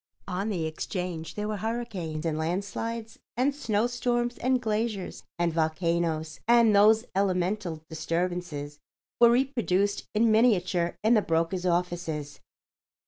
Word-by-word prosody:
On 195 +3 -2
the 175 -6 -1
Exchange 165 0 -4
there 210 0 -3
were 215 -1 -2
hurricanes 200 -9 -4
and 160 -2 0
landslides 200 +7 -3 0.2
and 265 +3 +2
snowstorms 240 0 0
and 255 0 +2
glaciers 215 -3 -2 0.2
and 170 -1 +1
volcanoes, 160 -1 0
and 235 -3 +5
those 215 +3 +5
elemental 185 -3 -1
disturbances 160 -2 -3 0.4
were 235 - +8
reproduced 235 -6 +1
in 225 +1 +4
miniature 185 -6 +2
in 220 +2 +5
the 215 - +5
broker's 165 +2 0
offices. 170 -4 -2
190 Hz, 120 wpm, -27 LUFS, 165-225 Hz, 0.4 s, were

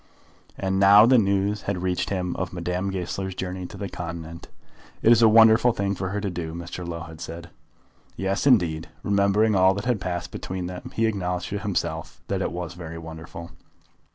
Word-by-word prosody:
And 95 0 -1
now 100 +2 +8
the 125 +1 +6
news 100 0 +1
had 90 -3 -2
reached 90 -1 -1
him 90 -2 -2
of 90 -1 -3
Madame 90 +2 -2
Goesler's 95 0 -4
journey 90 -1 -4
to - - -11
the 100 - -4
continent. 85 -2 -7 0.6
"It - - +5
was 120 -1 +6
a 115 - +7
wonderful 115 +2 +6
thing 100 -1 -1
for 95 -1 -3
her 105 +2 -2
to 100 -1 -2
do," 85 -2 -5
Mr. 85 +1 -6
Low 85 -1 -5
had 80 -1 -10
said. 85 +1 -8 0.6
Yes, 95 +7 -1
indeed! 85 - +3
Remembering 100 +2 +3
all 95 0 +4
that 100 - -4
had 120 -5 0
passed 90 -1 -3
between 90 -1 -5
them 90 0 -7
he 115 - +2
acknowledged 90 -5 -2
to 100 - -3
himself 100 -3 -3
that - - -1
it - - -1
was 90 0 -5
very 85 -2 -8
wonderful. 80 +1 -9
95 Hz, 190 wpm, -25 LUFS, 85-100 Hz, 0.6 s, now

